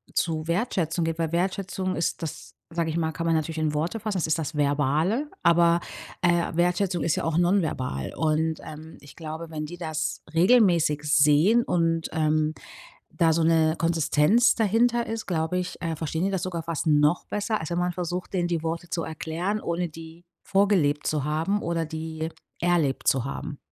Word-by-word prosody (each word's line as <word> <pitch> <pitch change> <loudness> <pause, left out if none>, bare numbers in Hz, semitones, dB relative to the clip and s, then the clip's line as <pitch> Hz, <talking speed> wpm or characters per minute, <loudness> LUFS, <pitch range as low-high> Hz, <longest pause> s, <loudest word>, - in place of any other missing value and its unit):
zu 160 -1 -1
Wertschätzung 170 -3 0
geht 165 0 -3
weil 165 -1 -1
Wertschätzung 185 +1 -1
ist 165 0 -2
das, 155 - -7 0.2
sage 165 -1 -1
ich 160 - -2
mal 160 -1 0
kann 165 +2 -4
man 165 - +3
natürlich 160 +1 -2
in 155 -1 0
Worte 170 +9 -1
fassen. 210 -3 -2
Es 165 - 0
ist 160 +1 +1
das 155 0 -4
Verbale. 150 - +1
Aber, 170 0 +5 0.4
äh, 175 -1 +2
Wertschätzung 180 -1 +1
ist 160 - +1
ja - - -2
auch 165 0 0
nonverbal. 160 - 0
Und, 160 0 0
ähm, 155 +1 -10
ich 140 -1 -15
glaube, 160 0 -7
wenn 155 -1 -4
die 175 +3 -8
das 155 -2 -3
regelmäßig 170 -6 +4
sehen 150 +10 +4
und, 165 -1 0
ähm, 155 0 +1 0.6
da 165 -2 +3
so 165 0 +1
'ne 160 -1 +3
Konsistenz 165 - +3
dahinter 235 +2 +2
ist, 225 0 -4
glaube 165 0 -1
ich, 180 -1 -5
äh, 165 -1 -2
verstehen 160 +2 -2
die 195 - 0
das 185 -3 -2
sogar 170 -3 -3
fast 165 -1 -3
noch 150 +2 +3
besser, 210 +1 -1
als 160 - -5
wenn 170 - -1
man 180 0 0
versucht, 180 +2 -4
denen 175 -2 +1
die 165 -2 -2
Worte 165 +1 -3
zu 165 - -2
erklären, 165 +6 -3
ohne 170 0 -2
die 165 +2 -12 0.2
vorgelebt 190 -8 +2
zu 150 -3 0
haben 165 +7 0
oder 165 -1 -1
die 160 0 -5 0.3
erlebt 170 -6 +1
zu 130 -2 +3
haben. 140 +1 -5
165 Hz, 185 wpm, -26 LUFS, 155-180 Hz, 0.6 s, Aber